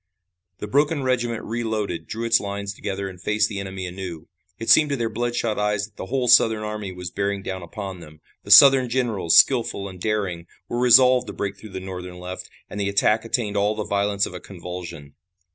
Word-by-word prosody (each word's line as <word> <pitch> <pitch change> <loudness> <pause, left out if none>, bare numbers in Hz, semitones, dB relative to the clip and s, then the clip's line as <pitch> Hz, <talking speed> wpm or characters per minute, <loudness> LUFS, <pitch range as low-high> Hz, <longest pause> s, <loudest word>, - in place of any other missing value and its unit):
The - - -6
broken 145 +4 +1
regiment 120 -3 -1
reloaded, 110 -7 -3
drew 115 +1 -4
its 115 0 +4
lines 100 0 -5
together 100 -1 -4
and 90 -2 -10
faced 105 +1 +1
the 100 -2 -5
enemy 95 -1 -6
anew. 90 -3 -7 0.3
It 115 - 0
seemed 150 -2 +6
to 140 - 0
their 115 -3 -2
bloodshot 120 -1 -2
eyes 105 0 0
that 105 -1 -21
the 95 - -7
whole 130 +1 -1
Southern 110 -2 +5
army 105 -2 -5
was 90 -1 -7
bearing 100 0 -2
down 95 -1 -5
upon 95 +1 -7
them. 75 -2 -14 0.2
The - - -12
Southern 130 +4 +8
generals, 115 -9 +1
skillful 120 -6 +3
and 90 -2 -11
daring, 95 -5 -2 0.2
were 120 - -3
resolved 125 +1 +5
to - - -6
break 100 -1 -4
through 110 -3 -13
the 95 - -4
Northern 90 -1 -8
left, 90 +1 -8 0.2
and 105 - -7
the 100 -1 0
attack 105 +3 +2
attained 110 -3 -2
all 105 +2 +1
the 105 - -3
violence 100 0 0
of - - -8
a 90 - -7
convulsion. 90 -5 -9
105 Hz, 205 wpm, -23 LUFS, 95-115 Hz, 0.3 s, Southern